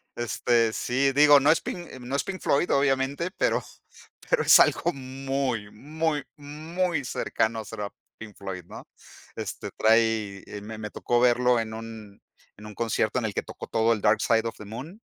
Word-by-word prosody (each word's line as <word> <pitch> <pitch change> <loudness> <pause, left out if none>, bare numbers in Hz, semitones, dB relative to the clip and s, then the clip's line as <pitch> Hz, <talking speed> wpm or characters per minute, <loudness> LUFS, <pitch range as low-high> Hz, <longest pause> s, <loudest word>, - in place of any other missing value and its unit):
este, 120 -1 +1
sí 135 +2 +1
digo 145 +1 +7
no 145 +3 +4
es 165 - +2 0.4
no 125 +3 -4
es 140 - +1
Pink 190 -1 -6
Floyd 145 +5 +1
obviamente, 140 +5 +1
pero - - +1 0.7
pero - - +3
es - - +8
algo 175 - +3
muy, 130 -4 -3
muy, 150 +4 -2
muy 155 +3 -3
cercano 110 -3 -1
será 100 0 -5 0.3
Pink 105 -2 -10
Floyd, 95 -2 -6
¿no? - - -11 0.5
Este, - - -6
trae, 110 -3 +2 0.2
me 110 +1 -8
me 105 -1 -6
tocó 120 0 0
verlo 125 0 +4
en 110 -1 -4
un 110 -2 -9 0.4
en 105 - -12
un 105 -1 -10
concierto 115 +1 0
en 115 - -3
el 105 - -3
que - - -2
tocó - - -9
todo 115 +1 +2
el 105 - -4
Dark 105 +2 +3
Side 115 0 +2
of - - -6
the 105 - -10
Moon. 140 - -9
120 Hz, 175 wpm, -26 LUFS, 110-140 Hz, 0.7 s, es